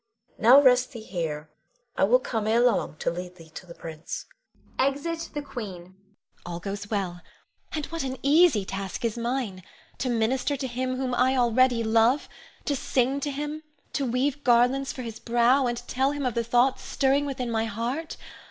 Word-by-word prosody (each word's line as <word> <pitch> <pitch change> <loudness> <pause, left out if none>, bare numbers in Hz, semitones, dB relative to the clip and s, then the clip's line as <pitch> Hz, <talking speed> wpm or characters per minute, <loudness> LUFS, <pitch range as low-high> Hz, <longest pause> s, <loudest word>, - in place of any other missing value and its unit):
Now 245 +5 +8
rest 255 -1 +4
thee 235 - -7
here. 160 -6 -4 0.4
I - - +3
will 240 +5 +5
come 225 -4 -3
ere 225 +2 +3
long 245 -9 +2
to - - -1
lead 180 +1 -6
thee 165 -3 -15
to 180 - -10
the 170 - -11
prince. 160 -1 -7 0.5
[Exit 305 +5 -1
The 295 - -2
Queen. 230 -9 -6
Ione. 175 +1 -14 0.5
All 175 -1 -5
goes 200 +3 -5
well; 185 -4 -2 0.5
and 305 -2 -3
what 330 0 -5
an 260 0 -3
easy 285 - +5
task 195 +5 -4
is 225 - 0
mine! 235 -5 -2 0.4
To 255 - -1
minister 250 +5 0
to 270 - -4
him 255 +1 -2
whom 255 -1 -2
I 255 +2 +3
already 245 0 +3
love; 225 +5 +3 0.4
to 285 - 0
sing 265 +1 +1
to 290 - -2
him, 295 +2 -4 0.4
weave 270 +2 0
garlands 250 +3 +3
for 255 - -7
his 230 -2 -7
brow, 240 +3 +3
and 240 0 -1
tell 265 +2 +1
him 290 -2 -3
of 250 - 0
the 235 - 0
thoughts 245 +3 +2
stirring 275 +1 +1
within 255 -3 -3
my 225 0 +1
heart. 240 +9 -3
245 Hz, 180 wpm, -26 LUFS, 220-270 Hz, 0.5 s, Now